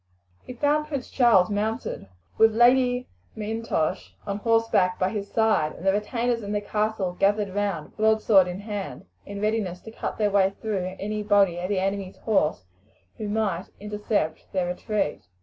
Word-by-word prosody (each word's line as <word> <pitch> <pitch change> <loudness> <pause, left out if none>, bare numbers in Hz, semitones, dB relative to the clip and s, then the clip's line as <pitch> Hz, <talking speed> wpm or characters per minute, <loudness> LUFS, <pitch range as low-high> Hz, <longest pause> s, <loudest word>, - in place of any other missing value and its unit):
He - - -9
found 295 +4 +1
Prince 280 -5 -5
Charles 225 -7 +4
mounted, 215 - -2 0.3
with 225 -1 +5
Lady 250 +1 +4 0.3
M'Intosh 215 -6 -2
on 200 -1 -2
horseback 225 -5 +2
by 185 - +1
his 205 -1 -4
side, 215 -9 +2
and 180 - -10
the 195 - +4
retainers 230 +3 -1
in 205 0 -4
the 205 - +1
castle 210 -3 -1
gathered 205 -1 +2
round, 200 -6 -2
broadsword 215 -3 +4
in 180 +2 -5
hand, 205 - -6 0.2
in 200 0 -6
readiness 210 -4 -1
to 220 - -10
cut - - -5
their 210 -2 +1
way 195 -1 +3
through 190 -4 -3
any 210 +1 -3
body 200 -4 +3
of 180 +1 -3
the 205 - 0
enemy's 195 0 -2
horse 155 - 0 0.5
who 215 -2 -4
might 205 -4 -1
intercept 210 -5 -2
their 185 -2 0
retreat. 180 -1 -2
205 Hz, 165 wpm, -25 LUFS, 190-220 Hz, 0.5 s, with